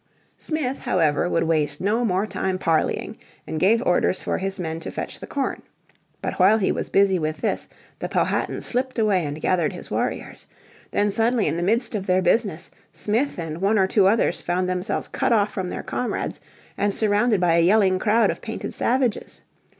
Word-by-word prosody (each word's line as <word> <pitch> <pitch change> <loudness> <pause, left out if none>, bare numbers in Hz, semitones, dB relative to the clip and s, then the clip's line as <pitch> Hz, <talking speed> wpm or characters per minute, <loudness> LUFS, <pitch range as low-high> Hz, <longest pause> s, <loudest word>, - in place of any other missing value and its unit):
Smith, 290 -5 -2
however, 165 -1 +1
would 165 - +1
waste 150 -3 0
no 215 +5 +1
more 195 -2 +1
time 190 -2 -2
parleying, 165 -4 0 0.3
and 155 - -4
gave 225 +7 +3
orders 180 +1 +2
for - - -2
his 195 +1 -3
men 165 -3 -4
to - - -6
fetch - - -6
the - - -8
corn. 275 -2 -2 0.6
But - - -3
while 195 +4 +6
he 200 - +1
was - - -3
busy 195 -2 +3
with 155 0 -3
this - - -1 0.3
the - - -4
Powhatan - - 0
slipped 255 +1 -2
away 205 -5 +2
and 145 0 -4
gathered 170 -1 +1
his - - -10
warriors. - - -3 0.4
Then 205 0 +1
suddenly 225 +1 +1
in - - 0
the 170 - -2
midst 225 +8 +1
of 200 -3 -3
their 185 0 +2
business 190 -7 0 0.2
Smith 235 +7 -1
and 165 -1 -5
one 205 +3 +3
or 190 - +4
two 190 0 +3
others 220 +3 +2
found 180 +1 -1
themselves 185 +3 -2
cut 260 - -1
off 210 -2 +3
from 185 -2 -3
their - - -5
comrades, 250 - -3 0.4
and 205 0 +1
surrounded 210 0 +2
by 170 -2 +3
a - - +5
yelling 190 0 +4
crowd 215 +1 +3
of - - -8
painted 225 - -5
savages. 250 -2 -1
195 Hz, 190 wpm, -23 LUFS, 175-220 Hz, 0.6 s, while